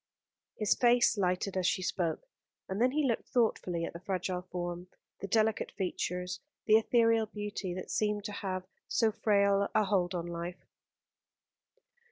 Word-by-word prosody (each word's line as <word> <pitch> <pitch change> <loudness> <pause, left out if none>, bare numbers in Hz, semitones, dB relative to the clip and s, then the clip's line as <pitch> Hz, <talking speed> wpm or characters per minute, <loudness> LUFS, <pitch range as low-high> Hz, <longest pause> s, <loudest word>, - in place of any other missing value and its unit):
His 215 -2 +3
face 240 -1 +4
lighted 185 0 0
as 185 -1 +1
she 185 - 0
spoke, 180 - -2 0.4
and 190 +3 -3
then 250 - +5
he 290 +1 +1
looked 230 - -1
thoughtfully 180 -8 +1
at - - -6
the 170 - -7
fragile 185 -1 -2
form, 175 -1 -5 0.3
the 195 - -5
delicate 220 +1 +1
features, 180 -1 -3 0.3
the 215 0 +7
ethereal 230 -1 +3
beauty 205 -3 -4
that 185 - -6
seemed 210 -1 0
to 210 - -4
have 190 -2 -3 0.2
so 225 -2 +2
frail 200 -2 +3
a 215 - +5
hold 185 -2 +1
on 170 -1 -2
life. 175 +1 -6
195 Hz, 155 wpm, -31 LUFS, 180-220 Hz, 0.4 s, the